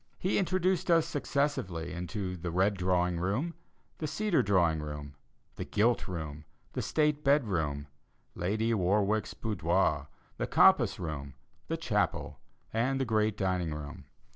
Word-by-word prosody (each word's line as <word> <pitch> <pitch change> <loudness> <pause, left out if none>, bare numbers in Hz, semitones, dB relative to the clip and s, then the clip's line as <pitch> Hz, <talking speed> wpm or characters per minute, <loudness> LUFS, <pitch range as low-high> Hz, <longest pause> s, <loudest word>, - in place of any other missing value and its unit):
He 185 - +1
introduced 185 -1 +1
us 165 -2 +5
successively 95 - -1
into 90 +2 -4
the 90 0 -4
"Red 95 +4 +2
Drawing 90 -2 +1
Room," 110 - -1 0.5
"The 155 - -2
Cedar 205 +4 +1
Drawing 85 -6 +2
Room," 75 -1 -6 0.4
"The - - -3
Gilt 115 +3 +1
Room," 80 -5 -5 0.3
"The - - -2
State 150 -1 +1
Bed 140 -1 +4
Room," 75 -8 -1 0.5
"Lady 110 +6 0
Warwick's 100 +2 +1
Boudoir," 85 -7 0 0.3
"The - - -2
Compass - - +5
Room," 70 -5 -5 0.3
"The - - -1
Chapel," - - -1 0.3
and 130 +4 +1
"The 135 - +1
Great 110 -2 +1
Dining 90 -5 0
Room." 75 -2 -8
95 Hz, 140 wpm, -30 LUFS, 85-130 Hz, 0.5 s, us